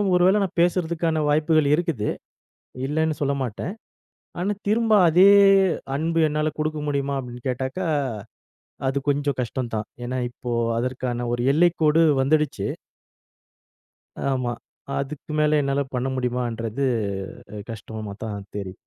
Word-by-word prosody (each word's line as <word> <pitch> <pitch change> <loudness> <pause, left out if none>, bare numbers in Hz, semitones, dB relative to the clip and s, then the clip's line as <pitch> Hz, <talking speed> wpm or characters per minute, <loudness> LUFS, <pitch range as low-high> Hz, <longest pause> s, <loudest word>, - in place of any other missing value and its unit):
ஒரு 180 - +4
வேள 200 +3 +4
நான் 185 -2 -5
பேசறதுக்கான 170 -2 +1
வாய்ப்புகள் 155 0 +3
இருக்குது, 160 - -1 0.8
இல்லன்னு 155 +2 0
சொல்ல 140 -1 +1
மாட்டேன். 125 - -4 0.7
ஆனா 195 +3 0
திரும்ப 225 +2 +2 0.2
அதே 180 +4 +7 0.7
அன்பு 165 +3 0
என்னால 150 +1 0
குடுக்க 155 0 -1
முடியுமா? 140 -1 -1
அப்டின்னு 125 0 -9
கேட்டாக்கா, 130 +8 -2 1.0
அது 135 +1 0
கொஞ்சம் 145 -1 0
கஷ்டந்தான். 115 -3 -3 0.2
ஏனா 125 +1 -3
இப்போ 120 0 -7 0.3
அதற்கான 125 -1 -2
ஒரு 120 - -1
எல்லைக்கோடு 165 -1 +4 0.2
வந்துடுச்சு. 145 -7 +1 1.7
ஆமா. 125 -2 -1 0.5
அதுக்கு 140 +2 -5
மேல 150 0 +3
என்னால 140 0 0
பண்ண 125 +1 -1
முடியுமான்றது 120 0 -2 0.7
அ - - -6
கஷ்டமா 110 -1 -7
தான் 100 -2 -5
தெரி 95 -2 -4
140 Hz, 120 wpm, -24 LUFS, 120-160 Hz, 1.7 s, அதே